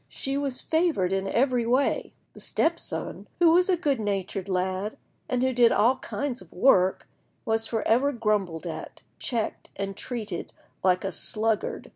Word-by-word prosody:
She 270 0 -3
was 280 -2 -1
favoured 315 - +1
in 195 0 -1
every 245 +3 +2
way. 255 +4 +1 0.2
The - - -13
step 335 +1 0
son, - - -5
who 340 -2 +5
was 360 +3 +4
a 365 - +3
good 285 -6 0
natured 195 -2 -2
lad, 185 +3 -1 0.3
and 250 0 +1
who 260 0 +2
did 240 -1 +5
all 245 +5 +4
kinds 270 -2 -4
of - - -16
work, 190 -8 +3 0.4
was 225 0 +1
for 225 -2 -2
ever 255 +6 +3
grumbled 210 - -1
at, 165 - -7 0.2
checked, 230 -4 -2
and 195 0 -4
treated 220 -6 -5 0.3
like 185 -1 +3
a 195 - -2
sluggard. 215 +2 -1
225 Hz, 165 wpm, -26 LUFS, 195-270 Hz, 0.4 s, who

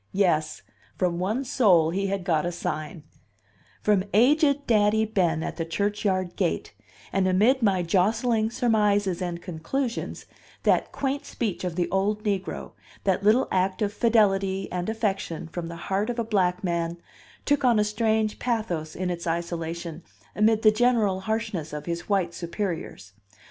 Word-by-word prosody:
Yes; 175 -6 +1 0.3
from 175 -2 0
one 215 +9 -1
soul 185 -11 +4
he 195 +3 -1
had 195 -1 -2
got 160 -4 +1
a 175 - -1
sign 155 -2 -4 0.8
from 205 -3 +3
aged 285 +4 +4
Daddy 220 -1 +3
Ben, 175 -7 0
at - - -5
the 165 - -1
churchyard 190 +1 -1
gate; - - -1 0.4
and 190 -1 +2
amid 215 +9 +3
my 195 -5 +2
jostling 220 +5 +2
surmises 210 -6 +1
and 175 -1 -4
conclusions, 225 - -3 0.4
that - - +2
quaint 280 +1 -2
speech 215 -7 -3
of 180 -2 -3
the 175 -1 0
old 205 +3 0
negro, 195 -3 -3 0.3
that 195 -1 +1
little 220 +5 +4
act 185 +2 +1
of 205 0 -1
fidelity 195 -4 +2
and 180 +2 -2
affection 195 -7 -2
from 165 +1 -5
the 170 - -7
heart 195 +5 -2
of 245 - -3
a 235 - 0
black 185 -5 0
man, 170 -1 -1 0.5
took 285 -1 +2
on 240 -3 +4
a 210 - +4
strange 220 0 0
pathos 180 -10 -2
in 180 0 -2
its 170 -1 -5
isolation 170 0 -3 0.3
amid 220 +1 +3
the 215 - +7
general 220 -4 +2
harshness 210 -6 -3
of 150 - -5
his 170 +2 -4
white 185 -4 +1
superiors. 170 - -5
195 Hz, 155 wpm, -26 LUFS, 175-220 Hz, 0.8 s, the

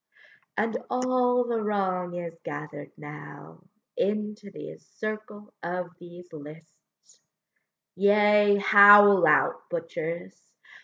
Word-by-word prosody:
And 220 +2 -1
all 250 -1 0
the 235 -2 -3
wrong 190 -4 -2
is 170 -2 -6
gather'd 145 0 -8
now 150 +1 -12 0.3
Into 210 0 -3
the 195 - -11
circle 215 -1 -9
of 180 +1 -5
these 175 0 -14
lists: 150 - -16 0.8
Yea, 205 +1 +3
howl 205 -2 +7
out, 150 - +1
butchers! 165 - -7
195 Hz, 95 wpm, -25 LUFS, 165-210 Hz, 0.8 s, howl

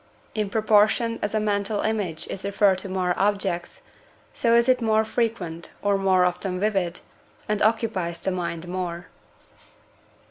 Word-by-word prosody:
In 210 -2 -1
proportion 220 +2 +3
as 205 +1 -2
a - - +3
mental 205 0 0
image 195 -7 -2
is 195 - -6
referred 200 -1 +3
to 195 - -6
more 185 -1 0
objects, 195 -3 -1 0.5
so 230 -1 +2
is 235 +1 +4
it 255 -1 +3
more 220 -1 +2
frequent, 215 -8 -2
or 205 0 +3
more 190 -2 +3
often 180 +1 -2
vivid, 190 -4 -1 0.5
and 210 -1 -1
occupies 210 -7 0
the 190 - -1
mind 175 -2 -4
more. 175 -1 -4
200 Hz, 145 wpm, -24 LUFS, 180-215 Hz, 0.5 s, is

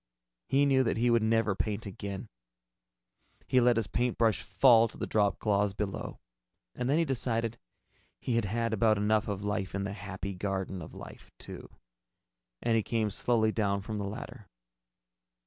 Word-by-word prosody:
He 140 +1 +3
knew 135 -2 +4
that 115 - 0
he 120 +1 +3
would 115 -1 +4
never 110 -1 +2
paint 105 +2 -3
again. 100 +2 -6 1.2
He 130 - +3
let 120 0 +4
his 115 -1 +1
paintbrush 115 +1 +1
fall 115 -4 +5
to - - -13
the - - -2
dropcloths 100 -1 +1
below. 100 -2 -4 0.6
And 125 - -3
then 145 - +3
he 165 - +3
decided 115 -4 -1 0.6
he 125 - -2
had 115 -2 +1
had 115 +3 -1
about 110 0 +3
enough 105 +1 +1
of 100 -1 -3
life 105 -2 -2
in 100 - -1
the 100 0 -3
Happy 100 0 -6
Garden 95 -1 -3
of 80 - -10
Life, - - -11
too, - - -8 0.9
and 115 - +2
he 110 - +3
came 110 -1 -1
slowly 110 +1 +2
down 100 -3 0
from 105 0 -4
the 100 - -3
ladder. 105 -1 -8
110 Hz, 165 wpm, -30 LUFS, 100-115 Hz, 1.2 s, fall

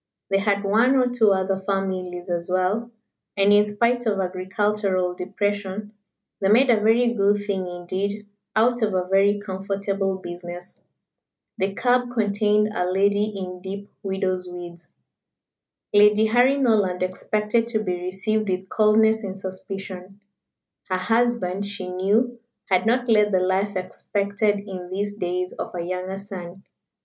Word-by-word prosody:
They 195 - +3
had 200 0 +1
one 225 +7 +3
or 250 -1 +3
two 230 -4 +3
other 190 0 +1
families 185 -2 -3
as 175 0 -3
well, 190 +6 0 0.5
and 200 +1 +5
in 205 0 +6
spite 235 +3 +1
of 205 -2 +1
agricultural 185 0 0
depression, 205 +2 -3 0.5
they 195 - +1
made 245 +5 +5
a 225 - +4
very 235 +2 +3
good 205 -1 +2
thing 190 -3 -2
indeed 190 +4 -4 0.3
out 240 +2 +3
of 210 -3 +1
a 180 -1 +1
very 200 +2 +3
comfortable 195 0 -2
business. 175 0 -8 0.8
The 195 +1 -1
cab 245 +1 +2
contained 210 -1 +2
a 180 -1 -1
lady 200 +2 +2
in 185 -4 -6
deep 200 +2 -7
widow's 190 -2 -2
weeds. 175 -1 -9 1.0
Lady 210 +1 +6
Harry 245 +5 +4
Norland 205 -9 +2
expected 210 +5 0
to 220 -2 -1
be 180 -3 -2
received 195 +4 -1
with 185 +1 -2
coldness 220 +1 +3
and 195 -1 -5
suspicion. 190 0 -7 0.7
Her 185 - +1
husband, 200 -1 0
she 200 -2 -6
knew, 210 +7 0 0.3
had 185 +3 +3
not 245 +2 +2
led 210 -2 +4
the 185 - +3
life 190 +2 0
expected 200 +2 -1
in 185 -3 -8
these 205 +2 -2
days 180 -2 -3
of - - -6
a 170 - -3
younger 185 +2 -4
son. 190 -2 -9
200 Hz, 145 wpm, -23 LUFS, 185-215 Hz, 1.0 s, in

